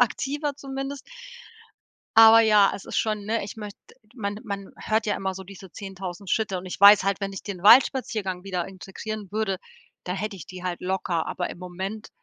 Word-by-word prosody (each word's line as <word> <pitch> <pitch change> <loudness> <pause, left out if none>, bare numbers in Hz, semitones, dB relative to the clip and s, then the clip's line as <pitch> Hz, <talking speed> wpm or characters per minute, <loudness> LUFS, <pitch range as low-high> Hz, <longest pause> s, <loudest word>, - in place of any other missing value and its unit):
aktiver 285 +4 0
zumindest. 275 0 -6 1.1
Aber 225 0 +9
ja, 210 -3 +5
es - - -12
ist - - -5
schon, 215 -2 0
ne, 225 -1 -1
ich 210 - -8
möcht 210 -2 -8 0.4
man 205 -4 -4
man 200 -2 -6
hört 220 0 0
ja 205 - 0
immer 190 -1 -3
so 190 - -7
diese 190 -1 -12
10.000 190 -1 -7
Schritte 205 -4 0
und 180 - -9
ich 185 - -7
weiß 200 +1 +9
halt, 195 +1 0
wenn 195 0 -3
ich 195 - -7
den 190 -4 -7
Waldspaziergang 215 -6 +4
wieder 180 -3 -3
integrieren 195 +2 -7
würde, 210 -3 -1 0.5
da 180 - -3
hätte 195 +2 -4
ich 170 - -10
die 185 -1 -10
halt 180 -1 -3
locker, 180 -3 -1
aber 180 - -3
im - - -9
Moment, 190 +4 -6
200 Hz, 190 wpm, -25 LUFS, 190-220 Hz, 1.1 s, Aber